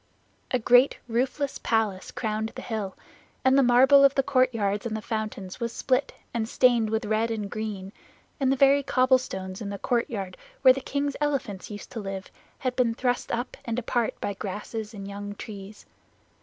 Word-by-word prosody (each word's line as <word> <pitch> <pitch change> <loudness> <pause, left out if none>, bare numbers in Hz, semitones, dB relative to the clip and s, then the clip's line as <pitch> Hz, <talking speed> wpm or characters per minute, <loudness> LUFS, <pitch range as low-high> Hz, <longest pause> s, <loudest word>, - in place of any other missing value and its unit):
A 255 - +2
great 245 +3 +5
roofless 260 +4 -1
palace 215 -5 0
crowned 220 0 -3
the - - -6
hill, 210 -4 -4 0.5
and 260 0 +5
the 275 - +6
marble 265 +3 +6
of 275 0 +5
the 270 - +3
courtyards 230 -7 +1
and 220 -1 -3
the - - -4
fountains 215 -3 -4
was 235 -1 -2
split, 255 +3 0 0.2
and 225 -1 -1
stained 240 -4 +3
with 220 0 -1
red 220 +2 +1
and 210 -3 -3
green, 205 -3 -5 0.5
and 265 -2 +2
the - - +3
very 275 +1 +5
cobblestones 255 -8 +1
in 205 - -4
the 200 - -4
courtyard 205 -5 -2 0.3
where 260 -1 +9
the 270 - -5
king's 280 +1 -2
elephants 270 -10 -2
used 205 -1 -8
to 230 - -5
live 195 -2 -6 0.3
had 255 -2 -2
been 240 -3 +2
thrust 245 0 -1
up 240 +2 -3
and 230 -1 -3
apart 240 -1 -1
by 200 - -2
grasses 210 +3 -5
and 195 -1 -7
young 205 0 -6
trees. 205 -1 -9
230 Hz, 180 wpm, -26 LUFS, 205-255 Hz, 0.5 s, where